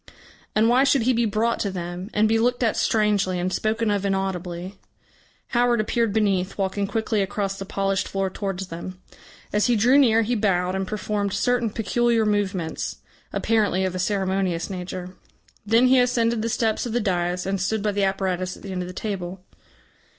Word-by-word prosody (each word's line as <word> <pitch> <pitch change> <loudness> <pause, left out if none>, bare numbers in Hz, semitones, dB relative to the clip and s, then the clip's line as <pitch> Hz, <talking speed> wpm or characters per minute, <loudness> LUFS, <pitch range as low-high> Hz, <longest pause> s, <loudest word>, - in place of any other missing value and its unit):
And 215 +1 +4
why 250 +3 +4
should 275 -3 +3
he 255 +2 +3
be 235 0 +2
brought 220 +3 0
to 200 - -1
them, 180 +1 -5
and 215 +1 +3
be 225 +1 +2
looked 245 +2 +1
at 225 - +2
strangely 205 -4 +1
and 185 +1 -1
spoken 220 0 0
of 200 -1 0
inaudibly? 190 -1 -3 0.7
Howard 240 -1 +2
appeared 225 +1 +1
beneath, 195 -3 0
walking 195 0 -1
quickly 220 -1 0
across 195 0 -2
the 195 - -5
polished 195 -1 -1
floor 195 -1 -2
towards 195 -2 -4
them. 180 +2 -7 0.5
As 210 0 +3
he 245 - +3
drew 245 +6 +5
near 230 -4 +4
he 235 +3 -1
bowed 185 -5 +1
and 190 0 -2
performed 205 -1 -2
certain 245 -2 +1
peculiar 230 +1 +1
movements, 200 -5 -1 0.3
apparently 210 -4 +1
of 185 - -2
a 185 - -4
ceremonious 190 -2 -1
nature. 180 0 -6 0.5
Then 230 +4 +5
he 255 0 +5
ascended 235 -2 +2
the 230 - -1
steps 225 0 0
of 225 - -5
the 240 - +2
dais, 180 -3 -1
and 195 0 -1
stood 210 +2 -1
by 210 - +1
the 200 0 0
apparatus 185 -2 -1
at - - -16
the 195 - -6
end 185 -1 -3
of 180 - -4
the 180 - -9
table. 185 -3 -5
200 Hz, 185 wpm, -24 LUFS, 185-225 Hz, 0.7 s, drew